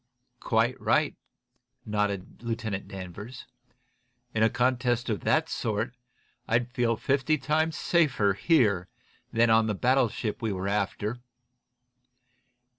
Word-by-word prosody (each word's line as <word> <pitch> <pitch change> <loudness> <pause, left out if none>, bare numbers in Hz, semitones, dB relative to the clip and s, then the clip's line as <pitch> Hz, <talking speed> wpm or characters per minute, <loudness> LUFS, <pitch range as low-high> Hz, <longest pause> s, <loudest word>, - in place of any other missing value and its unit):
"Quite - - +1
right," - - +2 0.7
nodded 105 -2 -2
Lieutenant 115 -4 -3
Danvers. 100 +5 -8 0.9
"In 110 - 0
a 110 - +5
contest 125 -1 +1
of 105 - -1
that 155 +1 +2
sort 115 -2 -2 0.5
I'd 120 +1 +1
feel 120 -3 +1
fifty 140 +5 +1
times 155 +3 0
safer 130 - +2
here 100 - +2 0.4
than 115 0 +3
on 110 0 +4
the 105 - 0
battleship 120 -2 +1
we 110 -2 -1
were 95 0 -3
after. 105 +3 -1
115 Hz, 115 wpm, -28 LUFS, 105-130 Hz, 0.9 s, a